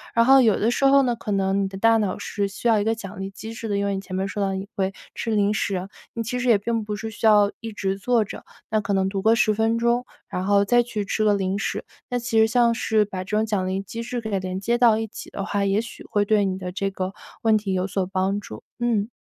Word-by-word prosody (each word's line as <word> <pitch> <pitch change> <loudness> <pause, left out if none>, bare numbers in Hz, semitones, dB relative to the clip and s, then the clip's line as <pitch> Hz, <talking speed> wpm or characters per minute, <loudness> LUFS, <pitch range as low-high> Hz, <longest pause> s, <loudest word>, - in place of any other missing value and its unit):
然 230 0 +5
后 270 +1 +7
有 225 -4 +3
的 225 +3 +2
时 275 - +1
候 275 0 +6
呢， 245 -2 +1
可 220 -2 -6
能 195 0 +1
你 - - 0
的 190 0 -8
大 225 +3 +4
脑 205 -4 -1
是 200 -1 -2
需 195 - -4
要 225 -2 +4
一 205 - 0
个 225 +1 +1
奖 195 -4 -9
励 195 - -4
机 220 +3 -8
制 225 -1 -6
的， 200 - 0
因 200 - 0
为 200 - 0
你 190 - -3
前 185 -1 -7
面 190 +1 -1
说 205 +1 -4
到 195 - 0
你 190 +1 -5
会 190 -1 0 0.2
吃 225 - -3
零 205 -1 +2
食， 195 -3 -2 0.3
你 230 - -3
其 250 +3 -3
实 250 - -2
也 220 - +6
并 225 +2 -2
不 210 0 -4
是 220 +1 -5
需 225 - -4
要 205 -1 +5
一 225 -1 -5
直 195 -1 -2
坐 235 +1 +2
着， - - -9 0.3
那 215 -1 +1
可 205 - -2
能 190 0 +2
读 195 -1 -3
个 225 +2 +4
10 215 -1 +3
分 225 +2 +1
钟， 235 +1 +1 0.2
然 185 +1 -3
后 200 0 +4
再 240 +3 +4
去 215 -4 -4
吃 215 - -1
个 210 -1 +4
零 195 0 0
食， - - -2 0.3
那 245 0 -1
其 235 -1 -1
实 220 - +6
像 235 0 +3
是 220 -2 +1
把 185 -2 -5
这 210 +3 -2
种 220 - +2
奖 205 -4 -1
励 190 +1 -1
机 230 +4 -7
制 240 +1 -3
给 220 - -5
它 200 -2 0
连 185 0 -4
接 235 +4 +1
到 235 -3 +5
一 225 0 -2
起 - - -9
的 195 - -5
话， 205 -1 -1
也 195 +1 +2
许 230 - -10
会 205 -1 +1
对 210 0 +3
你 190 -1 -1
的 180 -1 -5
这 195 0 -1
个 190 0 -4 0.3
问 220 -1 +4
题 200 -2 -2
有 185 +1 0
所 190 -1 -1
帮 190 +1 -1
助。 110 - -10 0.2
嗯 230 -3 0
210 Hz, 310 characters per minute, -23 LUFS, 195-225 Hz, 0.3 s, 后